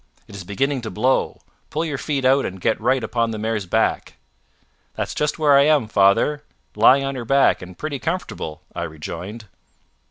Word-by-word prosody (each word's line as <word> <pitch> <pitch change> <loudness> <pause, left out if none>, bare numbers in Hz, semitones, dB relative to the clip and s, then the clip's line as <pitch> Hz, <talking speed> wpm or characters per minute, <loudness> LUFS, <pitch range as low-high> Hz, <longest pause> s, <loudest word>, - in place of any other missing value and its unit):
It - - -14
is 100 - -7
beginning 130 +8 -1
to 110 - -5
blow. 125 +8 0 0.3
Pull 160 +2 -2
your 145 -5 -3
feet 140 -3 -2
out 135 +2 +4
and 95 0 -5
get 110 +4 0
right 125 +2 +1
upon 115 +1 0
the 110 - -4
mare's 105 -2 -2
back." - - 0 0.8
"That's - - -3
just 150 -1 -1
where 150 -3 +4
I 140 0 +6
am, 150 -7 +3
father 100 +9 +3 0.3
lying 125 +6 +5
on 135 0 -2
her 125 -3 -5
back, 135 +4 +3
and 90 -1 -11
pretty 145 -3 -4
comfortable," 140 - -4
I - - -5
rejoined. 85 +7 -7
120 Hz, 185 wpm, -21 LUFS, 100-140 Hz, 0.8 s, I